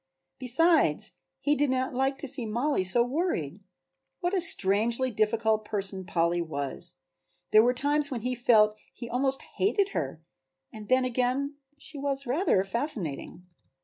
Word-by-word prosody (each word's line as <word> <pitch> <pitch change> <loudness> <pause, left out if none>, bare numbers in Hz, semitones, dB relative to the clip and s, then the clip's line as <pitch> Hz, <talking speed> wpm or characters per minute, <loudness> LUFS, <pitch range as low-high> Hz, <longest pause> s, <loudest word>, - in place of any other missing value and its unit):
Besides 315 +7 +2 0.3
he 290 - +2
did 290 -1 +1
not 260 0 -1
like 270 +2 0
to 285 - -1
see 255 -3 +1
Mollie 240 +1 0
so 210 +6 +3
worried! 245 - -2 0.6
What 355 +1 -2
a 380 - +2
strangely 235 - +2
difficult 215 0 +1
person 195 -3 -4
Polly 170 0 +1
was! 140 -5 -1 0.6
There 215 - +7
were 245 +2 +2
times 290 +2 0
when 250 -5 -4
he 250 +2 -2
felt 220 -3 +4
that 215 - -28
he 240 - -7
almost 265 +3 0 0.2
hated 400 0 +2
her 145 - -4 0.5
and 215 -1 -10
then 255 0 +3
again 255 +3 -1 0.2
she 290 0 -10
was 275 0 -2
rather 255 - +1
fascinating. 195 - -4
245 Hz, 150 wpm, -28 LUFS, 210-280 Hz, 0.6 s, There